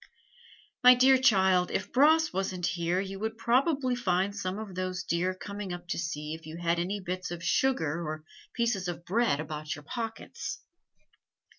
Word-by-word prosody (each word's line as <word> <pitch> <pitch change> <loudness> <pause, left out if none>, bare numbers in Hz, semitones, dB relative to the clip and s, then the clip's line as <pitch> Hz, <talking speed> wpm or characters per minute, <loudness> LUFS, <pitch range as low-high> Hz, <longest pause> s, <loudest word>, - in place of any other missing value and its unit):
"My 250 0 +9
dear 260 +1 +5
child, 190 -7 +4
if 190 +1 -3
Bras 310 +4 +4
wasn't 185 -2 -2
here 170 +1 0
you 195 0 -5
would 220 +1 -3
probably 260 +2 +2
find 195 -3 0
some 190 -1 -3
of 215 -3 -7
those 185 0 -3
deer 180 +2 0
coming 200 0 -6
up 175 0 -7
to - - -1
see 150 -2 -4
if 160 -1 -9
you 160 +1 -7
had 170 0 0
any 190 +4 -2
bits 185 -1 -4
of 170 -1 -6
sugar 170 - +1
or 155 0 -5 0.3
pieces 230 -6 0
of 175 0 -5
bread 220 -7 +1
about 155 0 -4
your 145 - -11
pockets." 230 - -5
185 Hz, 170 wpm, -29 LUFS, 170-230 Hz, 0.3 s, My